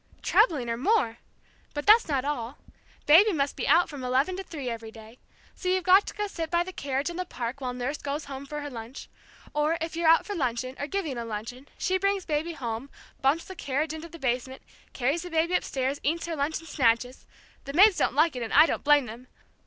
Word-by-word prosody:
Trebling, 280 -9 +3
or 230 0 -2
more. 260 - +1 0.6
But 290 - -3
that's 435 +3 +6
not 275 -4 0
all. 265 -3 -3 0.5
Baby 375 +8 +7
must 280 -3 -1
be - - -3
out 335 +5 +5
from 285 -4 -8
eleven 265 +8 +1
to - - -3
three 295 -8 -7
every 230 -2 -5
day. 220 +2 -14 0.3
So 365 - -4
you've 370 0 +1
got 375 +3 +5
to - - -6
go 420 - -2
sit 330 -5 -5
by 345 0 +2
the 375 +1 -8
carriage 280 +2 -2
in 340 - -8
the 365 - -1
park 255 -5 -5
while 255 -1 -2
nurse 250 +4 -4
goes 285 +2 -4
home 275 0 -8
for 295 +1 -5
her 290 - -5
lunch. 235 +2 -9 0.4
Or, 300 +2 +1
if 325 0 -4
you're 335 -1 +2
out 330 - +5
for 410 - -4
luncheon, 255 -5 -2
or 285 - -3
giving 315 -9 -3
a - - -3
luncheon, 230 +5 -7
she 375 0 0
brings 395 -1 0
baby 315 +2 -1
home, 240 -2 -5 0.3
bumps 285 +5 +2
the 375 - -8
carriage 305 -2 -2
into 320 +1 -8
the 335 - -11
basement, 260 -1 -2 0.3
carries 275 +6 0
the 355 - -7
baby 330 +1 +1
upstairs, 270 -5 -1
eats 330 +4 -1
her 335 -1 -3
lunch 295 +2 -1
in 325 - -14
snatches 250 -4 0 0.4
the 275 - -6
maids 390 +4 +6
don't - - +1
like 310 0 +3
it, 250 - -4
and 225 - -4
I 305 - +8
don't - - -2
blame 290 -2 +5
them! 240 +3 -10
290 Hz, 230 wpm, -27 LUFS, 255-335 Hz, 0.6 s, I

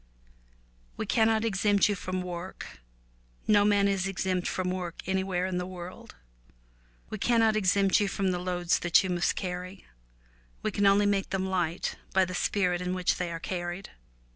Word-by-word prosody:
We - - -2
cannot 225 0 +2
exempt 205 -1 +3
you 210 - +1
from 185 -1 -3
work. 175 - -7 0.7
No 205 -1 +5
man 205 -1 +3
is 195 -1 0
exempt 185 -2 -1
from 185 -1 -1
work 180 -2 -5
anywhere 190 -1 0
in 185 -1 -2
the 180 - -3
world. 180 - -9 1.0
We 215 - -4
cannot 225 -1 +3
exempt 195 -1 +3
you 205 - +1
from 195 -1 0
the 180 - -2
loads 175 -1 0
that 175 +1 +4
you 190 - -2
must 175 0 +1
carry 180 +1 -5 0.4
— - - -33
we - - 0
can 200 0 +2
only 200 +1 +5
make 200 -1 +1
them 190 0 -1
light 180 -2 -1 0.2
by 190 -1 +5
the 185 - -6
spirit 180 -1 0
in 180 0 -2
which 180 -1 +1
they 175 -1 -3
are 165 - -4
carried. 175 +2 -5
185 Hz, 175 wpm, -28 LUFS, 180-200 Hz, 1.0 s, No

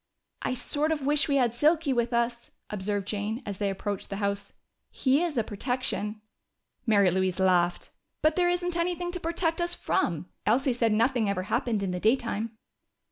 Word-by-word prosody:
"I 255 - -1
sort 300 +5 -1
of 295 -4 -1
wish 295 +1 +2
we 285 - +2
had 245 -4 +3
Silky 300 +3 +3
with 235 -1 0
us," 235 0 0 0.2
observed 205 -1 -2
Jane 215 +4 -3
as 200 -2 -5
they 200 -1 +1
approached 195 0 -4
the 195 - -3
house. 200 0 -2 0.4
"He 270 +3 +2
is 335 -6 -1
a 230 - +3
protection." 215 -1 -2 0.7
Mary 200 -4 +5
Louise 185 0 0
laughed. 180 -2 +2 0.3
"But 310 0 +4
there 355 -1 +3
isn't 355 0 -1
anything 350 +1 -1
to 360 - -4
protect 335 0 -1
us 345 0 +1
from! 175 - 0 0.2
Elsie 255 +4 +2
said 230 -2 +1
nothing 230 0 +2
ever 190 -2 -1
happened 230 0 0
in 190 - -1
the 180 - -2
daytime." 225 0 0
235 Hz, 180 wpm, -28 LUFS, 200-295 Hz, 0.7 s, Mary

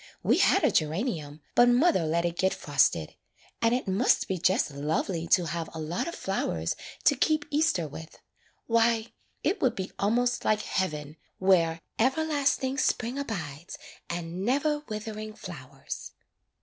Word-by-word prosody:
We - - +3
had - - +4
a - - +4
gera 155 +1 +1
nium, 160 - -3
but 240 0 +6
mother 245 - +3
let 170 +2 +1
it 170 -1 -1
get 190 +1 +1
frosted. 125 - +1 0.5
And 230 - +3
it 250 -2 0
must 195 +7 +2
be 185 -2 -2
just 185 -2 +2
lovely 160 +4 -2
to 175 - +4
have 165 0 -3
a - - -5
lot 160 - -2
of 340 - -4
flowers 85 - -2 0.3
to 285 - +5
keep 300 +3 +1
Easter 290 - +2
with. 160 +3 -10 0.5
Why, 230 0 +2 0.3
it 405 - 0
would 255 - +2
be 190 0 -4
almost 245 +4 +1
like 215 0 +2
heaven, 155 -5 -2 0.2
where 170 -4 +3
" - - -42
'Everlasting 275 0 +1
Spring 245 +1 0
abides 170 - -5 0.3
And 175 +1 -4
never 285 +6 +1
withering 215 0 -5
flowers. 135 -9 -8
190 Hz, 155 wpm, -28 LUFS, 160-245 Hz, 0.5 s, but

